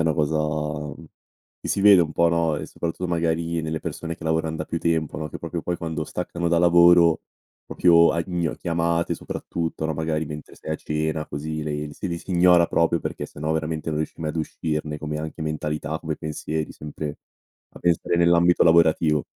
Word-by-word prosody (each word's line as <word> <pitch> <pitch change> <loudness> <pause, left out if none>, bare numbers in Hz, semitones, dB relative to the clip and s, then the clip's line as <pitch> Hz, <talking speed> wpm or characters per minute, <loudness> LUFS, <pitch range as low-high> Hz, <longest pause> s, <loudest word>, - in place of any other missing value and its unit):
una 80 -1 +2
cosa, 80 0 +1
mhmm, 75 0 -3 0.5
che - - -6
si 100 - 0
vede 100 -2 +8
un 80 -1 -4
po' 85 +2 +3
no? 85 -2 +1
E - - -5
soprattutto 85 +2 -4
magari 85 -1 0
nelle 80 0 -2
persone 85 -1 -5
che 80 - -11
lavoran 80 0 0
da 80 - -3
più 85 - -3
tempo 80 -3 0
no, 75 -1 -4
che - - -8
proprio - - -5
poi 90 -1 -2
quando 80 -2 -3
staccano 85 -1 -3
da 85 0 +3
lavoro 85 -1 +6 0.4
proprio 85 -1 +5
a 85 0 0
in 85 -3 -2
chiamate 85 0 0
soprattutto 80 -1 -4
no? 80 - -2
Magari 80 0 -1
mentre 75 -1 -9
sei 80 - -5
a - - 0
cena 80 0 -2
così 75 +2 -4
le 75 0 -3
le 75 - -10
si 95 - -5
le 85 -1 -3
si 95 - -11
ignora, 90 -1 +5
proprio, 85 0 +2
perché - - -4
sennò 75 +2 -3
veramente 80 0 -2
non 75 - -1
riesci 80 +1 -4
mai 75 -1 -1
ad 80 - -7
uscirne, 75 -1 -3
come 75 0 -4
anche 80 +1 -5
mentalità, 75 0 -3
come 80 -2 -3
pensieri 80 0 -4
sempre 75 0 -6 0.5
a - - -13
pensare 85 0 +1
nell'ambito 85 0 +4
lavorativo. 80 -2 +4
80 Hz, 200 wpm, -24 LUFS, 75-85 Hz, 0.5 s, vede